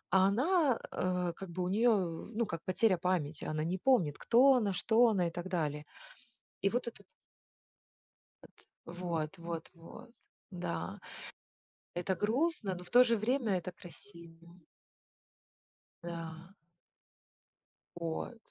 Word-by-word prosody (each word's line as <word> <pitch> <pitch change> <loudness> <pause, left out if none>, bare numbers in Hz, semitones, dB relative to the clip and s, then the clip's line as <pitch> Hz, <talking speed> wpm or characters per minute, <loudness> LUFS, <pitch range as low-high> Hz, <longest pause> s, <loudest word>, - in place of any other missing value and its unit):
А 190 0 +6
она, 275 - +2
э, 180 -1 -1
как 195 -2 -8
бы 180 +2 -3
у 180 - -1
нее, 225 +5 +3
ну, 210 +3 0
как 165 -4 -5
потеря 185 +1 +2
памяти, 170 -5 -1
она 155 0 -2
не 175 +3 -2
помнит, 180 - +2
кто 265 +3 +6
она, 220 -6 +2
что 220 +6 +4
она 185 -5 +1
и 170 - -4
так 175 +2 -5
далее. 150 -5 -2 0.7
И 195 - +3
вот 245 +3 -1
этот 200 -3 -8 1.8
От, 175 +1 -9
вот 170 -1 -3
вот 170 -1 -6
вот, 220 +8 -13 0.4
да. 180 -2 -4 0.9
Это 180 +2 -1
грустно, 220 - 0
но 180 - -8
в 180 - -15
то 245 +4 +8
же 230 -2 +2
время 225 -2 +1
это 180 - -6
красиво. 170 -1 -15 1.4
Да. 165 +1 -7 1.4
Вот, 170 +7 -4
185 Hz, 130 wpm, -33 LUFS, 170-225 Hz, 1.8 s, то